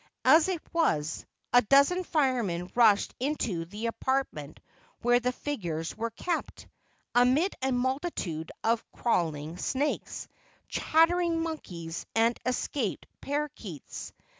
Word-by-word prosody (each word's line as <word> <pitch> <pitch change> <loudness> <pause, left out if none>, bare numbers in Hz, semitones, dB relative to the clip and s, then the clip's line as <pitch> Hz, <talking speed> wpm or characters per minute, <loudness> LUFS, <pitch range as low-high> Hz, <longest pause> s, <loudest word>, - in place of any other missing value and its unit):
As 315 +2 +7
it 370 -3 -1
was, 155 - 0 0.3
a 245 - +8
dozen 280 - +4
firemen 240 - 0
rushed 220 -4 +4
into 240 - -1
the 210 +6 -6
apartment 230 - -2 0.4
where 245 +1 +5
the 250 +1 0
figures 175 - -4
were 230 +1 -2
kept, 330 +9 -4 0.5
amid 255 +10 +4
a 265 0 +1
multitude 250 - -2
of 230 0 +2
crawling 160 -7 -1
snakes, 285 +3 -2 0.4
chattering 330 +1 +2
monkeys 175 - -5
and 230 +1 +4
escaped 250 -2 -1 0.2
paroquets. 275 - -5
245 Hz, 110 wpm, -29 LUFS, 180-295 Hz, 0.5 s, a